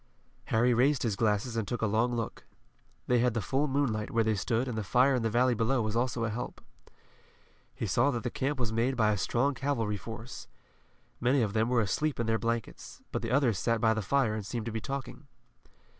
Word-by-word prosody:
Harry 120 +2 +3
raised 130 +4 +3
his 110 -5 0
glasses 110 +2 0
and 110 -3 -1
took 120 -2 -3
a - - +4
long 115 +3 +1
look. 115 -2 -4 0.6
They 125 -1 +3
had 120 -1 +2
the - - +1
full 135 +9 0
moonlight 130 -6 0
where 115 0 +2
they 110 0 +1
stood 115 +5 0
and 125 - -3
the 110 - -2
fire 125 +7 +3
in 125 - +1
the 115 - 0
valley 125 +3 +3
below 115 +3 +1
was 110 +1 -2
also 120 -1 0
a 115 - -1
help. 120 +3 -5 1.2
He - - -3
saw 120 +8 +2
that 120 -5 -2
the 125 - -2
camp 135 +1 -2
was 115 -3 -1
made 120 +4 +1
by 110 -2 +3
a - - +1
strong 135 +8 +1
cavalry 120 -6 -1
force. 110 +4 -8 0.7
Many 125 +1 +3
of 100 -2 -2
them 110 +1 +1
were 125 -2 +3
asleep 150 +8 -1
in 115 - 0
their 110 0 +1
blankets, 115 0 -4
but - - -2
the 115 - -3
others 125 -6 +2
sat 115 -1 +1
by 110 0 +3
the 110 - -2
fire 120 +2 +1
and 110 -1 -3
seemed 110 +2 -4
to 115 - -3
be 110 0 -3
talking. 140 +1 -6
115 Hz, 225 wpm, -30 LUFS, 110-125 Hz, 1.2 s, a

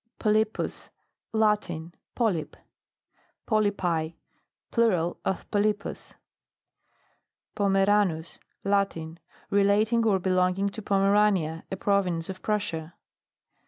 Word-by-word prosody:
POLYPUS. 215 0 0 0.4
Latin. 210 -7 0 0.2
Polype. 190 -11 -1 0.9
POLYPI. 180 -7 0 0.6
Plural 185 -8 +1
of 190 - -2
Polypus. 205 -1 -1 1.4
POMERANUS. 195 -4 +1 0.2
Latin. 195 -5 -1 0.3
Relating 210 +3 +3
or 200 -3 +4
be 185 0 -1
longing 185 +2 +2
to 220 +2 -8
Pomerania, 195 -5 +2
a - - -1
province 185 -4 0
of 185 0 -6
Prussia. 180 -6 -2
195 Hz, 85 wpm, -27 LUFS, 175-210 Hz, 1.4 s, or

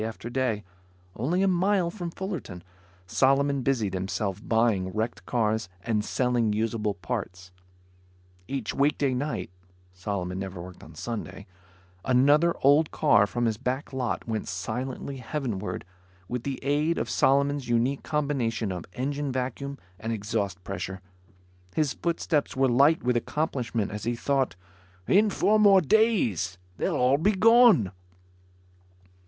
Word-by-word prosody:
Day 110 - -1
after 115 +1 -7
day, 120 -5 0 0.5
only 170 - 0
a - - +3
mile 185 -1 +2
from 175 -3 -5
Fullerton, 165 - -6 0.4
Solomon 135 +7 +2
busied 120 -7 0
himself 95 +1 -2
buying 110 -5 +2
wrecked 110 -4 -3
cars 110 -4 0
and 110 -3 0
selling 120 -2 +1
usable 105 -1 -1
parts. 90 0 -5 1.0
Each 135 -5 -3
weekday 140 -1 +2
night 140 -5 -3 0.4
Solomon 90 -1 -3
never 95 -2 -5
worked 90 +1 -10
on 80 - -13
Sunday 110 0 -6 0.6
another 145 +6 +4
old 145 +3 +5
car 100 -1 +4
from 120 +3 -1
his 110 -2 0
back 130 +3 -3
lot 125 -3 -2
went 110 -2 -3
silently 125 +9 -4
heavenward 125 - -4 0.4
with 125 -1 -3
the 135 +1 -3
aid 150 +4 +1
of - - -1
Solomon's 140 -1 +2
unique 120 +4 +1
combination 130 -8 -1
of 90 -2 -5
engine 140 +2 -2
vacuum 130 +2 -3 0.2
and 115 +4 -3
exhaust 100 -4 -2
pressure. 95 0 -5 0.8
His 150 -4 +1
footsteps 165 -4 -1
were 135 0 +4
light 140 +6 +4
with 125 0 +1
accomplishment 120 -5 -2
as 105 0 -6
he 120 +1 0
thought, 135 -1 0 0.5
"In 210 +3 +5
four 215 +2 +2
more 200 -2 +7
days, 150 - +2 0.2
they'll - - 0
all 130 +3 +3
be 200 +6 +3
gone." 220 - +6
125 Hz, 135 wpm, -27 LUFS, 105-145 Hz, 1.0 s, more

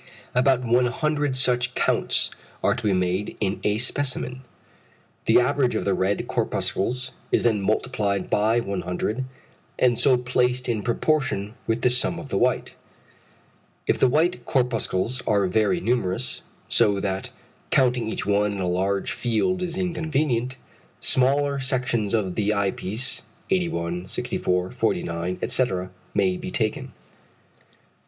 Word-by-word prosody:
About 130 0 +3
100 130 +4 +1
such 125 -1 +2
counts - - +1 0.3
are - - +4
to - - -5
be - - +3
made 90 +2 -1
in 100 -1 -1
a 105 0 +1
specimen. 130 +1 +1 0.9
The - - +6
average 125 -1 +1
of - - -1
the 100 - +2
red 95 +2 0
corpuscles 125 +6 -1 0.2
is - - +3
then 110 -4 +2
multiplied 100 -2 0
by 110 +3 +2
100 100 +5 -3 0.5
and 120 -2 +3
so 130 0 +4
placed 125 0 0
in 115 -3 0
proportion 120 -3 0
with 115 +1 -1
the 125 - +4
sum 125 - +2
of - - -8
the - - 0
white. - - +1 1.1
If - - +1
the 130 - +5
white 165 +7 +1
corpuscles 125 -3 0
are 100 -2 +3
very 110 - +2
numerous, 120 - -1 0.3
so 100 -1 +3
that 95 -1 -3 0.4
counting 125 -3 +2
each - - -3
one 105 +1 +2
in 100 - -5
a 90 - -1
large 95 +2 0
field 125 +11 0
is 175 -1 -3
inconvenient, 150 -8 -1 0.4
smaller 140 +2 +3
sections 125 -5 0
of 95 -5 -1
the 105 +1 0
eye 100 -1 +1
piece 110 +9 -1 0.3
81, 90 - -1
64, 90 -1 -1
49, 85 +2 -1
etc. 95 -8 +1 0.2
may 185 -1 +2
be 180 +1 -6
taken. 110 -11 -2
120 Hz, 135 wpm, -24 LUFS, 100-130 Hz, 1.1 s, The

